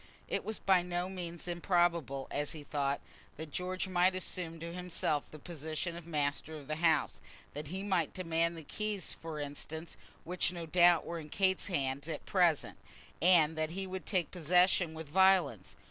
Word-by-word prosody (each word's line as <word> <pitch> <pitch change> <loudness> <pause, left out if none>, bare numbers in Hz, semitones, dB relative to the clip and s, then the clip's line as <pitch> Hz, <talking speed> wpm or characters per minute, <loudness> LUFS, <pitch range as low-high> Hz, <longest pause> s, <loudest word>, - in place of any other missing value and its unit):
It - - -1
was 220 0 -3
by 190 -2 +4
no 175 0 -2
means 175 -2 -6
improbable, 170 -6 +1
as 145 0 -1
he 155 -2 -8
thought, 140 -1 -1 0.4
that 155 0 -7
George 185 +4 -2
might 185 0 +3
assume 175 -3 -4
to 170 +1 -6
himself 175 -4 -1
the 155 - -10
position 160 +2 -4
of 170 -1 -9
master 150 0 -1
of 145 -3 -11
the 155 0 -2
house; 160 -3 +2 0.3
that 150 +1 -5
he 190 +5 -4
might 185 -6 +1
demand 170 -1 0
the 160 - -6
keys, 210 +2 -2
for 160 -2 -7
instance, 150 +3 -6 0.3
which 180 0 +1
no 170 -2 -5
doubt 175 +1 +5
were 170 0 -4
in 155 -1 -9
Kate's 190 +3 +2
hands 140 -5 -1
at - - -4
present, 175 -6 +2 0.4
and 165 -3 +5
that 155 0 0
he 190 +3 -4
would 190 0 -6
take 180 -6 +1
possession 180 0 +3
with 160 -1 -7
violence. 180 - +3
170 Hz, 175 wpm, -33 LUFS, 155-180 Hz, 0.4 s, doubt